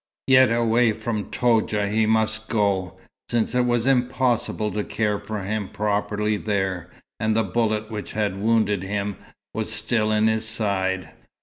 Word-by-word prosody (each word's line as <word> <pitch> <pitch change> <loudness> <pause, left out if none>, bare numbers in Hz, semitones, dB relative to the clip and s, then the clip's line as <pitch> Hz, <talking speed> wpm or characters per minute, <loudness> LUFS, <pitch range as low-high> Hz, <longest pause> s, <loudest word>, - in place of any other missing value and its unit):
Yet 130 -2 +6
away 115 0 +3
from 110 -1 -4
Toudja 110 -4 +1
he 110 +2 +1
must 110 0 0
go, 100 -4 0 0.3
since 115 0 0
it 125 0 +2
was 120 -1 +1
impossible 125 -4 +1
to 105 - -2
care 105 -2 -1
for 105 -1 -5
him 105 0 -3
properly 105 0 -1
there, 95 -4 -2 0.3
and 110 0 +1
the 115 - +3
bullet 110 +2 -1
which 105 -5 -5
had 100 -2 -1
wounded 110 -3 +2
him 100 +1 -3 0.4
was - - -2
still 110 -2 0
in 110 0 +3
his 110 0 +1
side. 95 -4 -1
110 Hz, 150 wpm, -23 LUFS, 100-115 Hz, 0.4 s, Yet